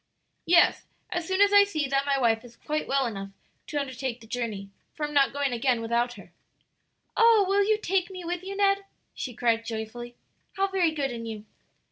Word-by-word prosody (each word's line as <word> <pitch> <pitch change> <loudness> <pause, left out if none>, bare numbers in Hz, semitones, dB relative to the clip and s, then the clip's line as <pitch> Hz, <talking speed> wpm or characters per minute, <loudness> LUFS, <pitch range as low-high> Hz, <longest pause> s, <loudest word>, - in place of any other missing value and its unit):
"Yes, 345 0 +4 0.2
as 345 -2 -2
soon 375 +1 +1
as 405 0 +5
I 405 0 +9
see 310 -8 -2
that 275 +1 0
my 280 -1 +2
wife 225 -3 +2
is 240 -1 -14
quite 305 +4 -3
well 275 -1 +1
enough 195 -4 -5 0.4
to 295 - -2
undertake 260 -3 -4
the 225 - -15
journey; 220 -4 -4 0.2
for 300 - -2
I'm 295 - -6
not 280 -2 +4
going 280 -2 -1
again 240 0 +1
without 235 +1 0
her." 190 -6 -14 0.8
"Oh, 455 -3 +6
will 400 +1 +3
you 430 +1 +2
take 380 -3 0
me 370 -2 -8
with 350 0 -3
you, 390 +1 -6
Ned?" 395 0 +2 0.3
she 250 -4 -6
cried 230 -1 +1
joyfully. 230 +2 -6 0.4
"How 390 - +1
very 375 -3 +2
good 285 -4 -2
in 230 -1 -6
you." 215 -1 -7
275 Hz, 200 wpm, -27 LUFS, 235-370 Hz, 0.8 s, I